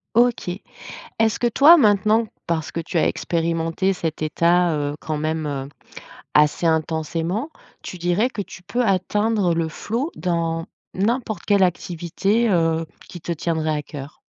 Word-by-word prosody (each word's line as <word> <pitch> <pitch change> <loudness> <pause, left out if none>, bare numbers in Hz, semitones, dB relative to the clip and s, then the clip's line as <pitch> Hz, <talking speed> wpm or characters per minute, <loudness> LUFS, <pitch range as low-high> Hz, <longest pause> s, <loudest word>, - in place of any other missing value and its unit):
OK. 240 -5 +3 0.7
Est-ce 220 -1 +2
que 240 - +2
toi, 285 +8 +7
maintenant, 215 - +3 0.2
parce 160 -2 -1
que - - -4
tu 170 +2 -3
as - - +3
expérimenté 165 +3 0
cet 165 -4 -4
état, 170 +2 +2
heu, 145 0 -2
quand 155 -1 -3
même, 155 +1 -2
heu, 135 -1 -4 0.7
assez 150 +3 +3
intensément, 165 - -1 0.3
tu 180 - -7
dirais 175 +7 +1
que 210 - -4
tu 180 - -12
peux 205 +7 -1
atteindre 200 -1 +1
le 165 -1 0
flow 235 - -3
dans 165 -2 -1 0.3
n'importe 220 +2 -1
quelle 200 -2 +4
activité, 180 +6 0
heu, 165 -2 +1 0.2
qui 175 - -9
te 170 - -3
tiendrait 160 -1 -1
à 150 - -3
cœur? 145 0 -9
175 Hz, 150 wpm, -22 LUFS, 160-210 Hz, 0.7 s, toi